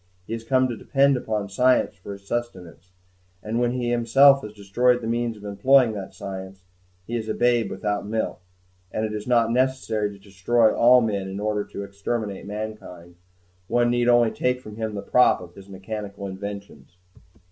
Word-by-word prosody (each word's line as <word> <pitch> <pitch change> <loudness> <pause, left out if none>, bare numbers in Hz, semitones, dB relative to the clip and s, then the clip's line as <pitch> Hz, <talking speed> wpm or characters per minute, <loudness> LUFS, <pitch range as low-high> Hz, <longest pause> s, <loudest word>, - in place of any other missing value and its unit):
He 115 - -6
has 115 0 -5
come 130 +2 +2
to 120 - -4
depend 140 +3 +2
upon 110 -5 -2
science 125 +6 +2
for 100 +2 -9
his 100 0 -14
sustenance, 95 -7 -5 0.5
and 110 +2 -2
when 120 0 +1
he 120 -1 -2
himself 135 +4 +5
has 105 - -8
destroyed 110 +5 +1
the 115 - -7
means 115 0 -1
of 105 - -15
employing 115 +5 +3
that 100 -2 -7
science, 95 -2 -8 0.4
he 120 - -4
is 110 -2 -3
as - - -1
a - - -10
babe 120 -2 +2
without 105 -1 -3
milk. 110 -4 -3 0.5
And 110 - -1
it 105 - -4
is 105 +1 -5
not 115 -2 +3
necessary 125 -4 0
to 100 - -11
destroy 105 +4 +1
all 125 +1 +6
men 100 -4 -2
in 95 +1 -5
order 105 0 -1
to 100 - -7
exterminate 100 0 -4
mankind; 105 -5 -7 0.5
one 120 +2 +2
need 120 0 +1
only 120 -2 +4
take 125 0 -1
from 105 -4 -11
him 110 -2 -3
the 100 - -5
prop 125 - +4
of 90 -1 -12
his 100 +1 -14
mechanical 100 +1 -7
inventions. 100 -1 -8
110 Hz, 190 wpm, -24 LUFS, 100-120 Hz, 0.5 s, all